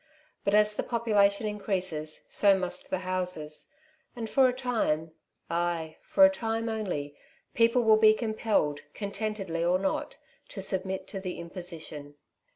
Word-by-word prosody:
But, 200 - +2
as 210 0 +4
the - - -2
population 215 -3 +2
increases, 185 -7 -3
so 200 -2 +4
must 180 -1 -3
the 185 - -2
houses; 180 -5 -2 0.4
and 230 -2 -4
for 265 +3 +4
a - - +2
time 225 -11 -1 0.2
— - - -37
ay, 170 -2 -1
for 290 - +5
a - - +7
time 225 -4 -2
only, 180 -10 -3 0.4
people 230 +1 +3
will 220 -1 +6
be 215 0 +6
compelled, 215 -10 0 0.2
contentedly 200 -4 -3
or 175 +1 +3
not, 190 0 -2 0.3
to - - -8
submit 190 0 -1
to 195 - -5
the 185 -2 -5
imposition. 165 -4 -6
195 Hz, 150 wpm, -28 LUFS, 170-220 Hz, 0.4 s, a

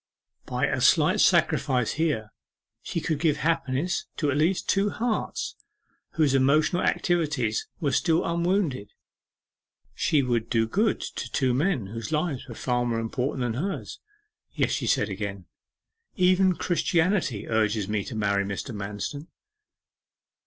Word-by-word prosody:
By - - 0
a - - -1
slight - - +4
sacrifice 125 -3 +3
here 145 -9 -1 0.5
she - - -3
could 155 -3 -1
give 155 -3 +2
happiness 155 +1 -1
to 145 -2 +1
at 140 - 0
least 170 +5 +1
two 200 +1 +2
hearts 225 +1 -2 0.6
whose 150 -4 +2
emotional 145 +6 +3
activities 150 -11 0
were 145 -4 0
still 165 +4 +2
unwounded. 170 - 0 1.0
She 145 -3 +2
would 120 -3 -1
do 115 -2 +2
good 210 - +1
to 125 - -6
two 130 -2 +1
men 145 - +1
whose 115 +8 -6
lives 155 -4 -1
were - - -8
far 125 -1 0
more 120 -1 -1
important 125 +4 -2
than 120 +2 -1
hers. 195 +2 -4 0.5
'Yes,' - - 0
she - - -1
said 105 - +2
again, 100 -1 -5 0.7
'even 185 0 +4
Christianity 170 - 0
urges 110 -2 +1
me 105 -1 -1
to 115 - -6
marry 100 -2 +1
Mr. 100 +5 -5
Manston. 105 +9 -5
135 Hz, 140 wpm, -26 LUFS, 115-170 Hz, 1.0 s, slight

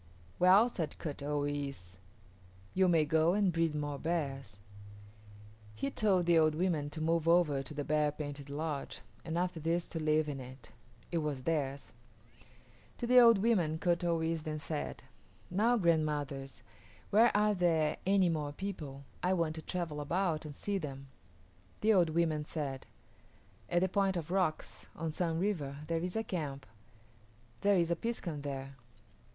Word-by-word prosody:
"Well," 190 +6 +6
said 170 -10 -4
Kut 145 -3 -5
o 145 +1 -1
yis´, 140 -11 -4 0.8
"you 190 0 +3
may 165 -3 +4
go 160 +3 +3
and 200 -4 +2
breed 165 -2 +1
more 145 -1 -3
bears." 135 - -3 1.2
He 135 +6 -2
told 190 -5 +2
the 170 -1 +5
old 155 -1 +3
women 160 -4 0
to 145 - -7
move 165 0 +1
over 165 -5 +4
to 135 +3 -8
the 145 - -2
bear 150 0 +1
painted 145 -1 -7
lodge 150 0 -4 0.2
and 165 0 -3
after 180 -1 -1
this 165 +2 -1
to 165 - -4
live 155 0 +2
in 140 -2 -4
it. 130 -2 -11 0.4
It 170 - +1
was 145 -4 -3
theirs. 140 -3 -2 1.0
To - - -3
the 250 +1 +7
old 230 -3 +8
women 190 -7 +2
Kut 175 +1 +1
o 170 -1 +2
yis´ 160 0 -1
then 155 0 -4
said, 150 0 -5 0.5
"Now, 225 +6 +3
grandmothers, 150 - 0 0.5
where 225 +4 +6
are 210 0 +3
there 165 -5 +2
any 195 -1 +3
more 150 -3 -1
people? 150 -7 -6 0.2
I 180 +1 +2
want 165 -3 0
to 160 - -7
travel 165 -4 -3
about 165 0 -1
and 150 -2 -8
see 200 +4 -2
them." 140 -4 -7 0.7
The 220 +1 +4
old 175 -5 +4
women 160 -2 +1
said, 140 -4 -4 0.8
"At 175 0 +2
the 185 - +3
Point 195 0 +1
of 170 0 -5
Rocks 180 -5 -1
on 165 -1 -3
Sun 165 0 -1
River 165 -8 -1
there 165 +1 -1
is 180 +1 -4
a 225 - 0
camp. 145 -9 -4 0.9
There 200 -1 +3
is 170 -1 +1
a - - +3
piskun 170 -8 -4
there." 135 -1 -5
160 Hz, 165 wpm, -33 LUFS, 145-180 Hz, 1.2 s, old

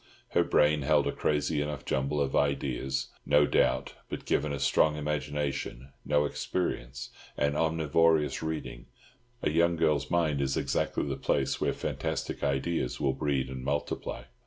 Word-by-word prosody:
Her - - +3
brain 75 0 +3
held 65 - +3
a - - +1
crazy 75 0 0
enough 75 -3 -4
jumble 70 +2 0
of 70 -1 0
ideas, 65 -2 0
no 75 0 +4
doubt; - - +1 0.2
but - - -5
given 75 - +1
a 70 - -2
strong 75 +3 +3
imagination, 75 -3 -3
no 75 0 +2
experience, 65 -6 -3 0.3
and 70 0 +1
omnivorous 80 -1 +2
reading, 80 -6 -5 0.6
a - - +2
young 85 +2 +3
girl's 75 -4 +1
mind 80 -5 +1
is 70 -1 0
exactly - - 0
the - - -2
place 70 -2 0
where - - +2
fantastic - - -3
ideas 70 +4 -1
will 65 -2 +1
breed 70 -2 0
and 65 -1 -6
multiply. 70 +2 -3
75 Hz, 150 wpm, -29 LUFS, 70-75 Hz, 0.6 s, no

